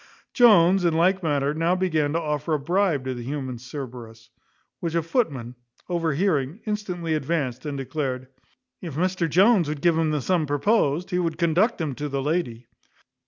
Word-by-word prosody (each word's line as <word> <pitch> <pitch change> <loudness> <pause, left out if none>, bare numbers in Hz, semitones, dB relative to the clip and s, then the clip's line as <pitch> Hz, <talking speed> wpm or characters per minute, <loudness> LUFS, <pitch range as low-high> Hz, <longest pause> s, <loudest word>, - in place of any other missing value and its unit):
Jones, 195 -6 +5
in 170 -2 +2
like 185 +3 +3
manner, 145 -3 0
now 165 +3 +1
began 160 -6 0
to 165 - +1
offer 150 0 -1
a - - -1
bribe 170 -1 +1
to 130 - -2
the 120 - -7
human 130 -1 -5
Cerberus, 120 -4 -9 0.5
which 170 -1 -3
a 170 - +1
footman, 145 - -1 0.4
overhearing, 165 -1 0
instantly 180 -6 -3
advanced, 150 -3 -2
and 145 -1 -4
declared, 130 -2 -3 0.5
"if 165 -7 -6
Mr 180 0 0
Jones 190 0 +4
would 150 -1 -3
give 170 -1 +3
him 160 -1 +1
the 150 -1 0
sum 165 +1 0
proposed, 165 +2 +1
he 180 - +1
would 165 -3 -1
conduct 180 +7 +2
him 155 -4 -2
to 145 +3 -5
the 140 0 -2
lady." 140 -7 -2
160 Hz, 170 wpm, -24 LUFS, 140-180 Hz, 0.5 s, Jones